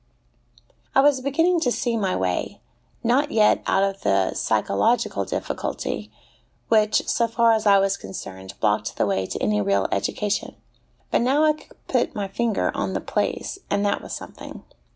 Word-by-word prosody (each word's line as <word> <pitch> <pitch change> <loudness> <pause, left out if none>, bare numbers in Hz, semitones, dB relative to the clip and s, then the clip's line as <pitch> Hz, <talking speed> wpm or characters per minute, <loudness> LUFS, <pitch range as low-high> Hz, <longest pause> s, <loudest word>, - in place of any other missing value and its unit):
I 270 - +7
was 280 -2 +4
beginning 325 +6 +2
to 250 -6 +1
see 240 -1 -1
my 195 -4 0
way 90 -1 -2 0.4
not 260 +5 +2
yet 215 -1 +3
out 195 - +3
of 195 0 -2
the 95 -1 +2
psychological 110 - +1
difficulty, - - -4 0.6
which, 215 -1 +3
so 235 - +2
far 230 0 +3
as 220 -1 0
I 200 -1 +7
was 195 0 +1
concerned, 95 0 -8
blocked 105 +1 0
the - - +2
way 95 -2 0
to - - -4
any 105 0 +1
real 100 -1 +1
education; 200 - -1 0.6
but - - +3
now 270 +5 +3
I 310 0 +5
could 305 - -19
put - - 0
my 205 -2 -2
finger 225 +2 0
on - - -2
the - - -1
place, 390 - -2
and 205 0 +1
that 200 - 0
was - - -10
something. - - -10
205 Hz, 170 wpm, -23 LUFS, -, 0.6 s, I